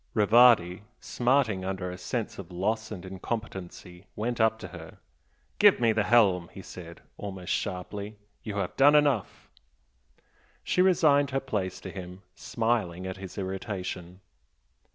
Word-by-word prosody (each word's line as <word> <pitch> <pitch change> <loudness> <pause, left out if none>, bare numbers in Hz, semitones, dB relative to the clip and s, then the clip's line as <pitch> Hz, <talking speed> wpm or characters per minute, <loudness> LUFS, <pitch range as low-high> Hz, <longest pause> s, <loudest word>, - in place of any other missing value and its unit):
Rivardi, 105 -4 +5 0.2
smarting 120 -6 +1
under 95 -1 -3
a 90 - -7
sense 110 +5 -4
of 95 - -8
loss 110 +5 -1
and 95 -4 -7
incompetency, 95 -2 -7
went 115 +2 -2
up 110 0 +3
to 110 - -9
her. 80 -3 -11 0.6
"Give - - +6
me 115 -2 +3
the 105 -1 +1
helm!" 95 -8 +3
he 95 - -10
said, 85 -2 -11 0.2
almost 95 -3 -4
sharply 100 +2 -4 0.2
"You 105 - -6
have 100 - -3
done 145 +2 +6
enough!" 145 -2 +1 1.2
She 180 - +1
resigned 155 -7 +4
her 135 0 0
place 105 -9 -3
to - - -7
him, 90 0 -9
smiling 110 -7 -2
at 95 0 -5
his 95 +1 -9
irritation. 95 -2 -5
100 Hz, 140 wpm, -28 LUFS, 90-115 Hz, 1.2 s, Give